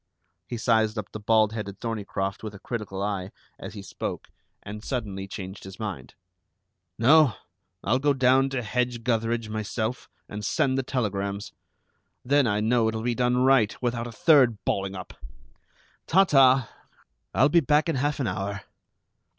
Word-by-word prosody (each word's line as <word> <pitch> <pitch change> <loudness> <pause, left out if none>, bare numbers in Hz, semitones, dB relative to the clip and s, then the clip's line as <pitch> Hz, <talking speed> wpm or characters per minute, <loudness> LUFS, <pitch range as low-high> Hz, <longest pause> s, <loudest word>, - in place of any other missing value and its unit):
He 120 - -4
sized 110 -1 +2
up 105 -1 -5
the 110 - -6
bald 110 0 +3
headed 100 -3 -6
Thorneycroft 100 -4 -3
with 110 -2 -7
a - - -11
critical 100 -5 -5
eye, 100 -2 -3 0.3
as - - -8
he 100 - -7
spoke, - - -6 0.3
and 105 +1 -8
suddenly 100 -8 -4
changed 95 0 -8
his 95 0 -10
mind. 105 -4 -6 0.8
"No. 145 +1 +5 0.5
I'll 125 +5 +2
go 145 +1 +2
down 130 +1 +3
to 130 -2 -3
Hedge 120 +1 -1
gutheridge 115 -1 0
myself 110 +2 -3 0.2
and 105 0 -7
send 130 +6 +1
the 135 - +1
telegrams. 100 -6 -3 0.7
Then 140 0 +3
I 105 0 +1
know 115 +1 +2
it'll 110 0 -2
be 120 0 0
done 125 +1 +1
right, 130 -5 +3
without 120 -1 -2
a - - -7
third 125 -3 +4
balling 95 0 -1
up. 95 - -8 0.9
Ta, 190 +4 +5
ta! 135 -7 +5 0.7
I'll 135 - +5
be 170 - +5
back 150 +1 +2
in 165 - 0
half 145 +3 -1
an 135 - 0
hour." 100 -2 -3
115 Hz, 160 wpm, -26 LUFS, 105-130 Hz, 0.9 s, No